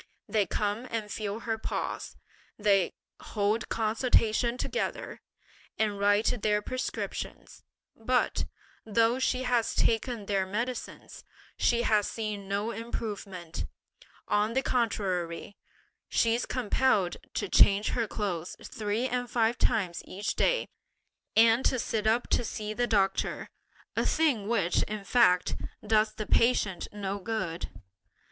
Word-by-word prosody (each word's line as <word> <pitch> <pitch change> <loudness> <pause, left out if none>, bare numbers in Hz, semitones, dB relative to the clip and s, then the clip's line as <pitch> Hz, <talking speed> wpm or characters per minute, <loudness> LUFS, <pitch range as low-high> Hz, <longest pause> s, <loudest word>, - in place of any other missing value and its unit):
They 210 -3 +1
come 210 +4 -1
and 215 -2 -3
feel 215 +1 -3
her 225 -1 -2
pulse, - - -4 0.4
they 200 -3 +3 0.3
hold 210 +1 -1
consultation 230 +1 +2
together, - - -3 0.6
and 210 -2 0
write 205 +3 +3
their 210 -1 +2
prescriptions, 255 +3 -5 0.3
but, 250 +3 +1 0.4
though 230 +3 +2
she 260 0 +1
has 245 -2 +1
taken 230 -1 +1
their 195 -2 0
medicines, 235 +5 -4 0.3
she 235 -1 +2
has 210 -3 +3
seen 210 -3 -4
no 200 +3 -1
improvement; 205 -7 -5 0.6
on 210 +2 +2
the 265 +2 +1
contrary, 195 -7 -1 0.5
she's 230 +1 +2
compelled 245 -6 +1 0.2
to - - -1
change 200 +1 +5
her 230 -2 0
clothes 185 -6 -3
three 215 +3 -2
and 245 -1 -2
five 230 0 +1
times 195 -7 +1
each 200 +3 -3
day, - - +2 0.7
and 230 +3 +6
to 260 - +3
sit 220 -2 -1
up 230 +2 +2
to - - +2
see 215 -1 -4
the 240 +2 0
doctor; 195 -4 0 0.4
a - - +1
thing 280 -11 +2
which, 200 -7 +2
in 210 -1 -3
fact, 180 -6 +4 0.3
does 215 0 +3
the 215 - -4
patient 210 -6 +2
no 200 -1 -3
good." 190 -5 -3
215 Hz, 125 wpm, -29 LUFS, 200-235 Hz, 0.7 s, and